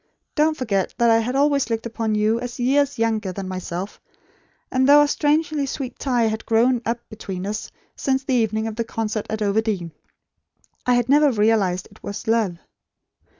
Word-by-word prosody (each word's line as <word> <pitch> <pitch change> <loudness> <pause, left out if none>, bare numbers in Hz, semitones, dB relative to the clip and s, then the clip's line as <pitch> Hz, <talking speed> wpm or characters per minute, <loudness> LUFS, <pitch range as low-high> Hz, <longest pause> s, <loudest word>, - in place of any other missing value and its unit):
Don't 310 0 +2
forget 200 -7 -1
that 235 -1 +4
I 225 - +5
had 245 +3 -2
always 280 -3 +2
looked 225 0 -2
upon 225 -2 -2
you 215 +2 +2
as 245 0 -6
YEARS 275 +3 +2
younger 220 -4 0
than 190 +1 -6
myself; 185 +1 -5 0.7
and 260 +1 +2
though 295 +1 +8
a - - +2
strangely 295 0 +1
sweet 260 -2 -5
tie 250 -4 +1
had 220 0 -1
grown 235 +2 +3
up 235 +1 -3
between 195 -4 -6
us, 210 +1 -4 0.3
since 265 0 0
the 270 - -1
evening 220 -2 +1
of 220 -1 -4
the 230 - 0
concert 220 -2 -3
at 220 0 -2
Overdene, 200 -4 0 1.0
I 250 - +4
had 245 -1 +1
never 290 +1 +5
realised 210 -5 +1
it 210 - -18
as 200 +1 -6
love. 220 -6 +1
225 Hz, 180 wpm, -22 LUFS, 215-260 Hz, 1.0 s, though